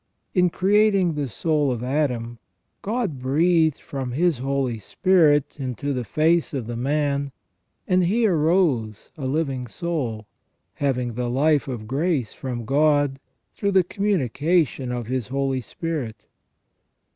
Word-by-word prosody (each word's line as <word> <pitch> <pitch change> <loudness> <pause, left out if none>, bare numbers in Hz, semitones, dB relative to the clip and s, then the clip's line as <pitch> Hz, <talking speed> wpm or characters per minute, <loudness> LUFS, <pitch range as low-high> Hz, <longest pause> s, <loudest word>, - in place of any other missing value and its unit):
In 180 -1 +4
creating 195 -1 +3
the 145 -2 -2
soul 145 - 0
of 120 -1 -3
Adam, 125 -4 -1 0.4
God 210 - -2
breathed 160 +4 +2
from 130 -3 -5
His 165 -1 +1
Holy 135 -3 -1
Spirit 150 - +2
into 135 +2 -3
the 125 -2 -2
face 155 - +1
of 130 -4 -3
the 120 +1 -5
man, 140 +2 0 0.6
and 185 -1 +3
he 225 +6 +2
arose 155 - +1
a 140 -5 -4
living 135 -3 -1
soul, 125 -7 -3 0.5
having 125 -4 -1
the 120 +1 -2
life 145 +4 +2
of 120 -5 -5
grace 140 -1 -1
from 120 -3 -5
God, 145 0 +2 0.3
through 200 -1 -1
the 190 -1 +5
communication 165 - 0
of 120 -1 -3
His 125 -2 -2
Holy 135 0 -1
Spirit. 120 -6 -5
140 Hz, 135 wpm, -23 LUFS, 125-165 Hz, 0.6 s, the